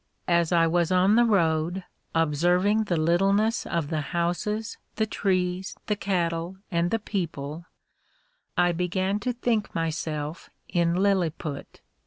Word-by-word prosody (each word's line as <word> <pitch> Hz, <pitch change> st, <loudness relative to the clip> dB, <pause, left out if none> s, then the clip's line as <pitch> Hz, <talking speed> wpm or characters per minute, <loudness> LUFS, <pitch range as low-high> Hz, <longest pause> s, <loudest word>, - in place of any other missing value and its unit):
As 170 Hz, -2 st, +2 dB
I 170 Hz, -1 st, +4 dB
was 170 Hz, +1 st, +1 dB
on 185 Hz, +2 st, +4 dB
the 240 Hz, +1 st, +5 dB
road, 175 Hz, -3 st, +1 dB, 0.3 s
observing 175 Hz, +7 st, +2 dB
the 175 Hz, -5 st, 0 dB
littleness 195 Hz, +7 st, +2 dB
of 165 Hz, -4 st, -1 dB
the 155 Hz, -2 st, -1 dB
houses, 180 Hz, +7 st, -2 dB, 0.2 s
the 220 Hz, -, +1 dB
trees, 185 Hz, -3 st, -1 dB
the 210 Hz, -, 0 dB
cattle, 175 Hz, -2 st, -1 dB
and 170 Hz, 0 st, +1 dB
the 225 Hz, -, +1 dB
people, 170 Hz, -6 st, -4 dB, 0.9 s
I 175 Hz, 0 st, +4 dB
began 185 Hz, +3 st, -1 dB
to 250 Hz, +3 st, -1 dB
think 235 Hz, -3 st, -1 dB
myself 160 Hz, -1 st, -3 dB, 0.2 s
in 170 Hz, -1 st, +1 dB
Lilliput. 175 Hz, -6 st, -1 dB
175 Hz, 130 wpm, -26 LUFS, 165-200 Hz, 0.9 s, the